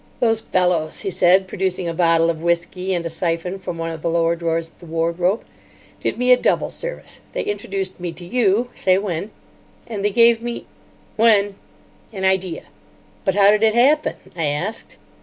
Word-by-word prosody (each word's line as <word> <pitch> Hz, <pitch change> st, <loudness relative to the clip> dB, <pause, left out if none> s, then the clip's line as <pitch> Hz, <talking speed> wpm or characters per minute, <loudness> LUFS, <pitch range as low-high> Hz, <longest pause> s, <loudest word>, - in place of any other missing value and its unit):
"Those 225 Hz, -2 st, +2 dB
fellows," 180 Hz, -6 st, 0 dB
he 195 Hz, -, -3 dB
said, 185 Hz, +2 st, +4 dB
producing 185 Hz, -2 st, -2 dB
a 165 Hz, -, -2 dB
bottle 165 Hz, -1 st, +3 dB
of 160 Hz, -1 st, -8 dB
whisky 170 Hz, +2 st, -1 dB
and 170 Hz, -1 st, -3 dB
a -, -, -2 dB
syphon 170 Hz, +3 st, -2 dB
from 180 Hz, -2 st, -6 dB
one 165 Hz, 0 st, -3 dB
of 160 Hz, -1 st, -7 dB
the 170 Hz, -, -1 dB
lower 165 Hz, 0 st, +2 dB
drawers 165 Hz, -1 st, -2 dB
of -, -, -32 dB
the 175 Hz, -, -13 dB
wardrobe, 170 Hz, +5 st, 0 dB, 0.6 s
"did -, -, -2 dB
me 250 Hz, +1 st, +2 dB
a 250 Hz, -, +8 dB
double -, -, +1 dB
service. -, -, -6 dB
They -, -, -2 dB
introduced 195 Hz, -2 st, -3 dB
me 175 Hz, -1 st, -4 dB
to 175 Hz, +2 st, -11 dB
you—say 205 Hz, -2 st, +1 dB
when—and 200 Hz, +3 st, -7 dB
they 205 Hz, -, +3 dB
gave 230 Hz, +2 st, +4 dB
me——" 240 Hz, 0 st, -5 dB, 0.5 s
"When." 210 Hz, -3 st, +4 dB, 0.6 s
"—an 190 Hz, -3 st, -3 dB
idea." 190 Hz, -3 st, 0 dB, 0.6 s
"But 190 Hz, -2 st, +1 dB
how 200 Hz, 0 st, +6 dB
did 210 Hz, 0 st, +2 dB
it 220 Hz, 0 st, +3 dB
happen?" 280 Hz, +6 st, +3 dB, 0.2 s
I 165 Hz, -3 st, -1 dB
asked. 150 Hz, +10 st, -4 dB
185 Hz, 175 wpm, -21 LUFS, 170-210 Hz, 0.6 s, a